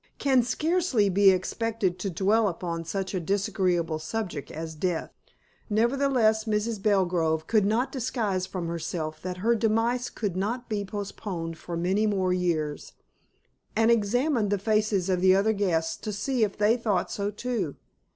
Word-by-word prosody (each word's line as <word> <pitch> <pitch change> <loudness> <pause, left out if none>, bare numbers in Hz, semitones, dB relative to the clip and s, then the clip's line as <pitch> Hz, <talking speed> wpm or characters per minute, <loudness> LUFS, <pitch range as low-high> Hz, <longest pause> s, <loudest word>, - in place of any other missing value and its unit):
can 265 -3 +3
scarcely 295 - +1
be 195 +1 +5
expected 190 0 0
to 195 - -2
dwell 200 +5 +2
upon 170 -2 -3
such 190 +4 -3
a 185 - 0
disagreeable 180 -3 0
subject 170 -2 -4
as 160 0 -6
death. 165 +1 -2 0.6
Nevertheless, 230 -1 +2
Mrs. 215 0 -1
Belgrove 175 -6 +1
could 210 -1 +2
not 230 +5 +1
disguise 220 -8 -1
from 180 -3 -4
herself 165 -1 -4
that 180 0 -4
her 235 - +5
demise 230 +2 +1
could 205 -5 -3
not 230 +6 -2
be 210 -2 -2
postponed 190 -5 -5
for 170 -1 -5
many 190 +5 +1
more 190 -3 +1
years, 160 -5 -2 0.8
and 225 +1 +4
examined 235 +1 +2
the 205 - +1
faces 210 -2 +1
of 185 -2 +1
the 185 0 +6
other 210 +3 +3
guests 175 -6 0
to 215 - -5
see 240 +4 0
if 205 -2 -1
they 210 +3 +3
thought 210 -6 0
so 200 0 -2
too. 210 - -3
200 Hz, 155 wpm, -27 LUFS, 180-225 Hz, 0.8 s, the